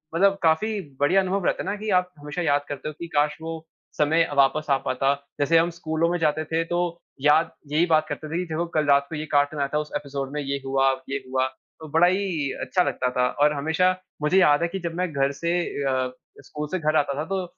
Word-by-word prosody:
मतलब 195 +3 +4
काफ़ी 205 +7 +2 0.2
बढ़िया 165 +7 +4
अनुभव 190 0 -1
रहता - - 0
है - - -4
ना 200 - -1
कि 215 +1 -5
आप 180 0 -6
हमेशा 150 +4 -5
याद 145 -3 +1
करते 145 +1 -5
हो - - -7
कि 170 - -5
काश 150 +1 +2
वो 160 0 -6 0.3
समय 160 +2 +3
वापस 140 +3 +3
आ 135 - +4
पाता। 135 +2 +2 0.3
जैसे 155 +3 +4
हम 165 +1 +3
स्कूलों 160 0 0
में 175 - 0
जाते 155 0 +1
थे 165 +1 0
तो 175 +1 -2 0.4
याद 150 +3 +4 0.2
यही 155 +3 +3
बात 155 -2 +2
करते 150 +1 -5
थे 160 - -2
कि 180 - -1
देखो 165 +2 0
कल 155 -1 +2
रात 140 0 +4
को 160 - -5
ये 155 0 -4
कार्टून 145 +1 +2
आया 140 - +1
था, - - +2
उस 150 0 -5
एपिसोड 140 -1 -4
में 150 - -2
ये 140 0 -2
हुआ, 135 0 +3 0.2
ये 140 - -1
हुआ 130 0 +1 0.3
तो 160 - -9
बड़ा 165 +3 +5
ही 180 -7 0
अच्छा 180 - +1
लगता 125 - -1
था। 125 0 +2
और 150 +1 +5
हमेशा 160 +5 +2 0.3
मुझे 150 +5 +2
याद 145 -5 +5
है 170 - +2
कि 190 +3 -5
जब 170 -2 -4
मैं 180 -1 -1
घर 140 0 +1
से 170 0 0 0.4
अ, 130 -1 0 0.3
स्कूल 150 0 -6
से 185 - -1
घर 155 -1 0
आता 145 -2 +2
था 155 - -2
तो 190 -1 -1
155 Hz, 240 wpm, -24 LUFS, 145-170 Hz, 0.4 s, बड़ा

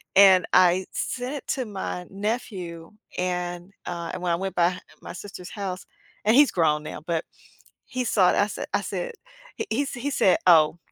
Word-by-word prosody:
And 190 -2 +7
I 185 0 +5
sent 255 +3 -3
it 280 - -8
to 260 - -3
my 190 -3 -5
nephew, 195 -5 -4 0.3
and, 180 0 -3
uh, 170 -1 -4
and 185 - -5
when 175 -1 0
I - - +3
went 190 +2 -4
by 175 +1 +2 0.2
my - - -8
sister's 185 -1 -9
house- 190 -3 -5 0.4
and 220 +3 +5
he's 290 0 +6
grown 150 -3 +2
now- 150 - -7
but 165 -1 0 0.6
he 255 -2 -3
saw 195 -6 +4
it, - - 0
I 200 - +3
said - - -5
I - - +2
said - - -4 0.5
h - - -2
he 270 +6 0
sa 260 -2 -6
he 285 - -1
said, 190 -9 +4
"Oh, 160 -1 +6
185 Hz, 190 wpm, -25 LUFS, 175-220 Hz, 0.6 s, And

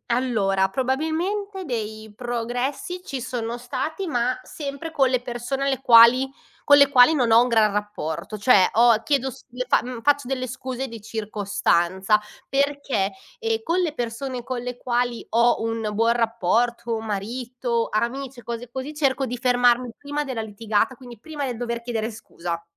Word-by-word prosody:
Allora 215 -6 +1
probabilmente 325 - -2
dei 220 -4 -5
progressi 250 - -3
ci 275 -8 -5
sono 240 -1 -4
stati, 315 +9 -4
ma 250 -3 0
sempre 285 +3 -6
con 270 -4 +3
le 255 -1 +1
persone 245 +3 -3
alle 270 -1 0
quali 250 +2 +7 0.4
con 285 - +9
le 280 -1 +6
quali 260 +3 +7
non 245 -6 +2
ho 225 - +8
un 250 - 0
gran 220 -3 +3
rapporto. 205 -2 -4
Cioè 205 -2 +5
ho 230 -1 +5
chiedo 270 +1 +1
s - - -14
le 250 +1 -4
fa - - +4
mhmm, 245 -1 -6
faccio 285 -2 +2
delle 255 -1 -2
scuse 255 +1 -5
di 230 -3 -9
circostanza 205 -2 0 0.3
perché, 275 -7 0 0.3
ehm, 450 -1 -1
con 350 -2 0
le 330 -4 -1
persone 245 0 -4
con 250 -1 -3
le 245 0 -5
quali 245 -1 -1
ho 235 +1 +3
un 225 -1 -2
buon 230 +2 +3
rapporto, 235 +1 0
marito, 235 +3 -3
amici 245 +3 -2
e - - -19
cose 235 +1 -5
così, 265 +4 -5
cerco 275 -3 +1
di 250 0 -4
fermarmi 245 0 +3
prima 290 +1 -3
della 255 -5 -3
litigata, 215 +3 -1
quindi 245 -2 -12
prima 295 +4 -6
del 245 -3 -3
dover 235 0 -3
chiedere 230 -2 -2
scusa. 170 -6 -6
245 Hz, 165 wpm, -23 LUFS, 225-270 Hz, 0.4 s, con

